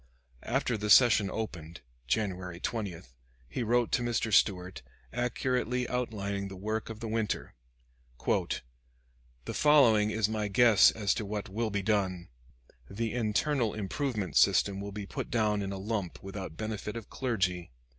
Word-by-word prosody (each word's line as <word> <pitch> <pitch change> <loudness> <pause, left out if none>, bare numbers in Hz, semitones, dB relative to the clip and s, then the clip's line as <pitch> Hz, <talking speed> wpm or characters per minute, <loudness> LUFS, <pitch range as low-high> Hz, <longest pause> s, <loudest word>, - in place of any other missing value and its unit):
After 120 - 0
the 105 +1 -3
session 110 -3 +6
opened, 85 -7 -6 0.3
January 90 - -2
20, 100 -6 -4 0.4
he 65 - -4
wrote 120 +1 +1
to - - +2
Mr. 120 -2 -1
Stuart, 90 -5 +2 0.3
accurately 125 +1 -1
outlining 100 -5 -2
the 95 - -8
work 110 +4 -3
of 110 -1 -8
the 115 - -4
winter: 110 -1 -2 0.7
"The - - -5
following 120 -9 +5
is 110 -1 +1
my 110 -1 -2
guess 110 0 +6
as 105 -2 0
to 110 - -3
what 105 -1 -4
will 110 +3 -1
be 100 -1 -2
done. 95 -4 0 0.6
The 115 +2 -3
Internal 120 +1 0
Improvement 105 - -3
System 100 -1 +4
will 100 0 -6
be 105 0 -6
put - - -5
down 105 -3 +1
in 100 0 -3
a 100 - -4
lump 100 -3 -4
without 95 -4 -7
benefit 110 0 -4
of 115 - -9
clergy. 95 -9 -1
105 Hz, 145 wpm, -30 LUFS, 95-115 Hz, 0.7 s, session